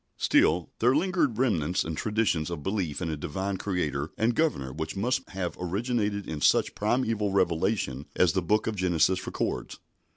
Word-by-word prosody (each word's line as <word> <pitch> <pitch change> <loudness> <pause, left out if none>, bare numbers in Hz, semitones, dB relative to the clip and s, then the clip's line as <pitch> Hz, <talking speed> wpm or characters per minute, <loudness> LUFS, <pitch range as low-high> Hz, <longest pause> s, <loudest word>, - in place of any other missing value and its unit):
Still, 85 -2 +3
there 125 +3 +4
lingered 165 - +1
remnants 90 - +1
and 80 0 -4
traditions 105 -6 0
of 85 -4 -5
belief 95 -5 -2
in 80 - -2
a - - -2
Divine 95 +7 -3
Creator 80 -7 -2
and 115 +2 +2
Governor 115 - 0
which 80 +2 -4
must 125 +6 -1
have 90 -3 -3
originated 105 +2 -1
in 75 -2 -5
such - - +4
a - - -26
primeval 110 -2 0
revelation 85 - 0
as 90 -3 +3
the 95 - +1
book 105 +5 +1
of 110 - -2
Genesis 90 -1 +1
records. - - -3
95 Hz, 170 wpm, -27 LUFS, 80-110 Hz, -, there